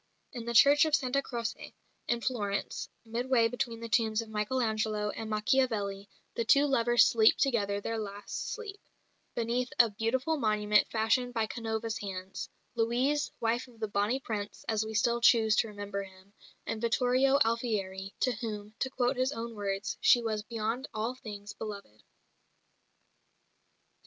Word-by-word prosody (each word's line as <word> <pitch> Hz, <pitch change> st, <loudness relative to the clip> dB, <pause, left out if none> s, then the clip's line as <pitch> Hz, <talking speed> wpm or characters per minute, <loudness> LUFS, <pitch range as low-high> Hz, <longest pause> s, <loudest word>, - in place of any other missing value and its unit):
In 240 Hz, -3 st, -6 dB
the 235 Hz, 0 st, -3 dB
Church 285 Hz, +6 st, +7 dB
of 310 Hz, -1 st, +3 dB
Santa 270 Hz, 0 st, 0 dB
Croce, 235 Hz, -3 st, -5 dB, 0.3 s
in 240 Hz, 0 st, 0 dB
Florence, 205 Hz, -6 st, -2 dB, 0.2 s
midway 235 Hz, +1 st, +2 dB
between 230 Hz, -1 st, -3 dB
the 230 Hz, -, -4 dB
tombs 220 Hz, -1 st, +2 dB
of 230 Hz, -1 st, -4 dB
Michael 215 Hz, +4 st, -1 dB
Angelo 215 Hz, -2 st, 0 dB
and 220 Hz, -1 st, -6 dB
Machiavelli, 210 Hz, -3 st, 0 dB, 0.2 s
the 230 Hz, -, -1 dB
two 280 Hz, +5 st, +5 dB
lovers 240 Hz, -4 st, +4 dB
sleep 220 Hz, -1 st, +5 dB
together 205 Hz, -7 st, +1 dB
their 225 Hz, +2 st, -3 dB
last 205 Hz, -1 st, -5 dB
sleep, 420 Hz, -3 st, -7 dB, 0.6 s
beneath 240 Hz, +2 st, -1 dB
a 235 Hz, -3 st, +6 dB
beautiful 255 Hz, +9 st, 0 dB
monument 210 Hz, -3 st, +2 dB
fashioned 240 Hz, +3 st, +1 dB
by 225 Hz, -1 st, +2 dB
Canova's 225 Hz, 0 st, -3 dB
hands 190 Hz, -1 st, -6 dB, 0.2 s
Louise, 245 Hz, +6 st, +1 dB
wife 235 Hz, +3 st, 0 dB
of 235 Hz, -3 st, -18 dB
the 220 Hz, -, -1 dB
"Bonnie 205 Hz, +5 st, 0 dB
Prince" 210 Hz, -5 st, -5 dB
(as 220 Hz, -1 st, +1 dB
we 220 Hz, 0 st, -6 dB
still 235 Hz, +2 st, +2 dB
choose 225 Hz, -2 st, +5 dB
to -, -, +3 dB
remember 205 Hz, -1 st, -5 dB
him) 190 Hz, 0 st, -14 dB, 0.3 s
and 220 Hz, -, -3 dB
Vittorio 255 Hz, +3 st, +3 dB
Alfieri, 200 Hz, -5 st, -2 dB
to 255 Hz, -, +3 dB
whom, 210 Hz, -2 st, -5 dB
to 260 Hz, -, 0 dB
quote 255 Hz, 0 st, 0 dB
his 255 Hz, +1 st, +1 dB
own 230 Hz, -3 st, -5 dB
words, 200 Hz, -1 st, -3 dB
"she 245 Hz, -, +6 dB
was 215 Hz, -2 st, -1 dB
beyond 225 Hz, +4 st, -3 dB
all 220 Hz, +3 st, -1 dB
things 210 Hz, -5 st, -9 dB
beloved." 200 Hz, -, -8 dB
225 Hz, 155 wpm, -30 LUFS, 210-245 Hz, 0.6 s, Church